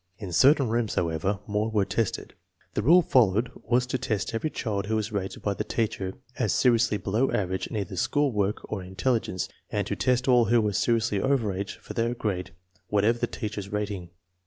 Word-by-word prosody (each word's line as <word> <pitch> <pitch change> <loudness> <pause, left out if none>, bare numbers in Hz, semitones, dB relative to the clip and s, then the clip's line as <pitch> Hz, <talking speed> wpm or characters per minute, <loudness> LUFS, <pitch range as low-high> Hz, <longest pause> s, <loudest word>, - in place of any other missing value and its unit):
In 100 -5 -7
certain 135 - +5
rooms, 115 -1 0
however, 85 +4 0
more 105 +1 -1
were 105 -3 +1
tested. 115 0 -2 0.4
The - - 0
rule 170 - +6
followed 115 -4 +3 0.2
was 125 +1 +3
to 125 +1 -2
test 115 -7 -2
every 115 +8 -1
child 105 -8 -3
who 110 - 0
was 110 0 -1
rated 95 -2 -4
by 100 - +1
the - - -3
teacher 100 -4 -2 0.2
as 110 -6 +1
seri 125 -3 +4
ously 110 -2 +1
below 110 +7 0
average 95 -2 -1
in - - -7
either 100 -1 -3
school 145 +10 +1
work 105 -1 0
or 105 -3 -4
intelli 95 +7 0
gence, 95 0 -4 0.2
and - - -1
to - - -2
test 125 0 +1
all 125 -2 +5
who 120 +2 +4
were 105 -2 0
seriously 115 -1 +1
over 130 -7 +1
age 100 +1 -4
foi - - -9
their 115 +1 0
grade, 95 -6 -2 0.4
whatever 105 +3 +2
the - - 0
teacher's 105 -3 -5
rating. 100 -4 -3
110 Hz, 205 wpm, -27 LUFS, 100-120 Hz, 0.4 s, rule